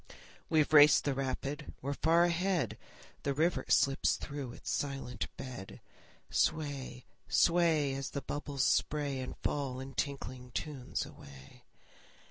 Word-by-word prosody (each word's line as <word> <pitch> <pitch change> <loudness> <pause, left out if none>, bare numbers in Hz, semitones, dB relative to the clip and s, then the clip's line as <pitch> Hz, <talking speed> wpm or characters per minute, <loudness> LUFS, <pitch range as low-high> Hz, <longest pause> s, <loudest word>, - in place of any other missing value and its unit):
We've 155 -1 +3
raced 150 0 +8
the 140 - 0
rapid, 135 +2 -4
we're 140 +2 -3
far 165 +4 +4
ahead! 175 - +1 0.5
The 140 -1 -1
river 165 +4 +1
slips 135 0 +3
through 140 -4 -6
its - - -6
silent 135 -3 -2
bed. 125 -8 -8 0.5
Sway, 140 -5 -1 0.2
sway, 165 -5 +3
As 135 0 -3
the 140 - -5
bubbles 145 -2 -2
spray 145 -3 +1
And 130 - -6
fall 135 -3 -1
in 135 +1 -7
tinkling 130 -3 -4
tunes 140 -5 -3
away. 70 -1 -14
140 Hz, 125 wpm, -33 LUFS, 130-150 Hz, 0.5 s, raced